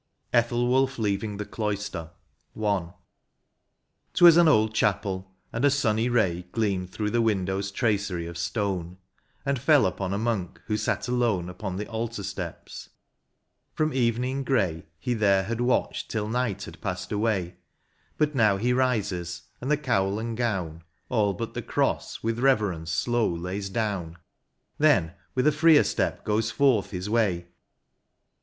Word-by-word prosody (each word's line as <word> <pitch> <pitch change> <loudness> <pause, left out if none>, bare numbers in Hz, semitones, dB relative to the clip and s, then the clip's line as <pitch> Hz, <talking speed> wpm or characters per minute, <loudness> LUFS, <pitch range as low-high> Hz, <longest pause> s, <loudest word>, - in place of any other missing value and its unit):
89 120 -1 +6
XLIV. - - -12 0.3
ETHELWULPH 135 0 +2
LEAVING 105 -1 -1
THE 105 - -4
CLOISTER. 100 -7 -3 0.3
— - - -18
I. 100 -5 +1 1.3
*T 175 - +6
WAS 170 -2 +10
an 170 -1 +6
old 110 -7 +4
chapel, 95 -3 0 0.2
and 115 - -2
a 145 - +6
sunny 120 -4 +1
ray 90 -7 +1
Gleamed 100 -5 0
through 105 +2 -3
the 120 - +2
window 95 -4 0
s 100 0 -3
tracery 100 -5 -1
of 85 - -8
stone, 90 +1 -2 0.5
And 140 -2 0
fell 145 +1 +5
upon 95 0 -2
a 100 - 0
monk 110 -5 -2
who 105 - -1
sat 105 +3 -1
alone 115 -8 +1
Upon 95 0 -5
the 105 +3 -3
altar 115 -1 -4
steps; - - -7 0.9
from 155 0 0
evening 125 +2 0
grey 95 - 0
He 125 +8 -2
there 100 -4 +3
had 115 +4 -3
watched 125 +1 0
till 105 -2 -2
night 115 -3 -1
had - - -10
passed 90 -4 -4
away; 105 -5 -1 0.6
But 150 0 +1
now 105 -7 +3
he 120 +5 +1
rises, 100 -9 -1 0.2
and 130 - -3
the 150 - +3
cowl 105 -9 0
and 115 +1 -3
gown. 95 -9 -2 0.3
All 105 -5 +1
but - - -5
the - - -3
cross, - - -1
with 115 +1 -1
reverence 105 -11 +1
slow 120 +5 +1
lays 90 +4 -4
down; 95 -6 -2 0.6
Then 100 - +4 0.2
with 125 - +1
a 150 - +6
freer 155 0 +6
step - - -1
goes 110 +1 +1
forth 130 -6 +2
his 90 0 -5
way. 100 -6 0
105 Hz, 160 wpm, -26 LUFS, 95-120 Hz, 1.3 s, WAS